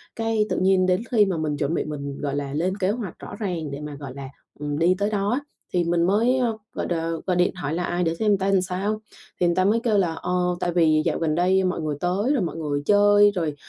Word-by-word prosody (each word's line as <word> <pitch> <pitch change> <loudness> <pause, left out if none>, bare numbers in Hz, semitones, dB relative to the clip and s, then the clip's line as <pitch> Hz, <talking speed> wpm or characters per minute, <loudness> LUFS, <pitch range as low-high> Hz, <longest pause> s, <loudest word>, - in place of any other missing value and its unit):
cái 225 -2 0
tự - - -1
nhiên 185 0 +3
đến 185 +2 +2
khi 215 -4 +5
mà 185 -4 -1
mình 150 -2 -2
chuẩn 145 +2 -1
bị - - -1
mình, 140 -2 -5
gọi 140 -1 -2
là, 140 -1 -3
lên 185 +6 -1
kế 190 -2 0
hoạch 210 -6 -5
rõ - - -8
ràng 170 -8 -3
để 140 +1 -6
mà, 150 -1 -6
gọi 140 -2 -8
là, 135 -1 -7 0.3
ừm, 145 0 -3
đi 175 +3 +4
tới 205 +2 0
đó 200 -1 -1
á. 255 - +1 0.3
Thì 175 - +2
mình 170 0 +1
mới, 225 +8 +3
ờ, 235 -3 0 0.2
gọi - - -3
đ - - -1 0.3
gọi 185 - +2
điện 180 +1 +2
hỏi 155 -4 -3
lại 175 0 -1
để 165 0 0
xem 210 +1 +2
ta 195 +1 0
sao, 195 +4 -2 0.4
thì 175 - +3
người 170 - +1
ta 185 - +2
mới 220 +3 +3
kêu 220 -4 +2
là, 175 -4 +1
ờ, 180 - -3 0.3
tại 175 -1 -1
vì 155 -3 +4
dạo - - 0
gần 155 -2 0
đây 185 +3 +3
mọi 185 -3 -1
người 150 -2 -2
tới 195 - 0
rồi 270 - +1
mọi 170 - -3
người 145 -3 -2
chơi 205 +1 +5
rồi 165 -6 -2
180 Hz, 265 wpm, -24 LUFS, 155-205 Hz, 0.4 s, khi